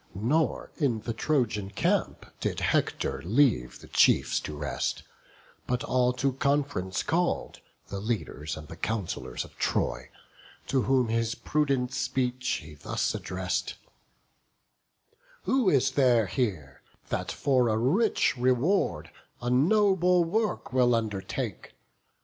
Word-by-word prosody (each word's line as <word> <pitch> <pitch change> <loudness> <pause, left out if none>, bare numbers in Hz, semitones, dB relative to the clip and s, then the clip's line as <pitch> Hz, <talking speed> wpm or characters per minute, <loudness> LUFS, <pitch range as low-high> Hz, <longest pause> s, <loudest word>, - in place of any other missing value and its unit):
Nor, 135 +11 0
in 125 -8 0
the 115 - -3
Trojan 110 -6 0
camp, 100 - 0
did - - -2
Hector - - 0
leave 105 - +2
The - - -13
chiefs - - +3
to 75 - -7
rest; 75 -1 -2 0.6
but 125 0 -1
all 125 -1 +2
to 135 +1 0
conf'rence 140 -9 0
call'd, 175 +2 0 0.3
The 100 - -4
leaders 100 -9 -3
and 75 -1 -9
the 85 - -9
councillors 105 -2 -3
of - - -17
Troy; - - -1 0.6
To 135 -1 +2
whom 130 -2 +2
his 115 0 0
prudent 135 -1 0
speech 130 -2 -1
he 75 0 -11
thus 75 - -2
address'd: 90 -1 -3 1.7
"Who 260 -7 +2
is 135 -3 +3
there 125 -5 +4
here, 90 - -3 0.3
that - - -2
for 130 -4 +2
a 110 - +1
rich 170 - +2
reward 125 - +1 0.3
A 120 0 -2
noble 180 +4 +4
work 210 - -1
will 125 -2 +4
undertake? 105 -4 -4
125 Hz, 125 wpm, -28 LUFS, 105-140 Hz, 1.7 s, there